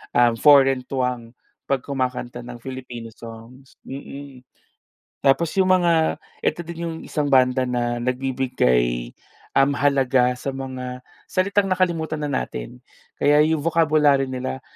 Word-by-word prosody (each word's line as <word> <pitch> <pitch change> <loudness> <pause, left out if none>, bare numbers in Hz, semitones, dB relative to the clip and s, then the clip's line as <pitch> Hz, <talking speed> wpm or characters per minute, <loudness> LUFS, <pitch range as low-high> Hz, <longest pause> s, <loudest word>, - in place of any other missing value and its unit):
ah, 120 -1 +5
foreign 135 -2 +5
twang 125 -3 -3 0.4
'pag 135 -2 0
kumakanta 125 -3 -3
ng 120 0 -8
Filipino 125 -3 -7
songs. 115 +4 -13
Mm. 140 0 -9 0.8
Tapos 140 +4 +2
yung 185 - +3
mga 170 -3 +2 0.3
ito - - 0
din 170 0 -7
yung 165 - -5
isang 150 -2 -1
banda 130 -1 +3
na 120 -1 -1
nagbibigay, 120 - 0 0.4
um, 135 +1 +4
halaga 135 -3 +2
sa 140 - -6
mga 130 -1 -6 0.3
salitang 200 +2 +1
nakalimutan 170 -4 0
na 145 - -2
natin. 60 - -4 0.4
Kaya 150 +1 +5
yung 160 0 +1
vocabulary 155 -4 +3
nila 125 - -4
135 Hz, 125 wpm, -22 LUFS, 125-150 Hz, 0.8 s, ah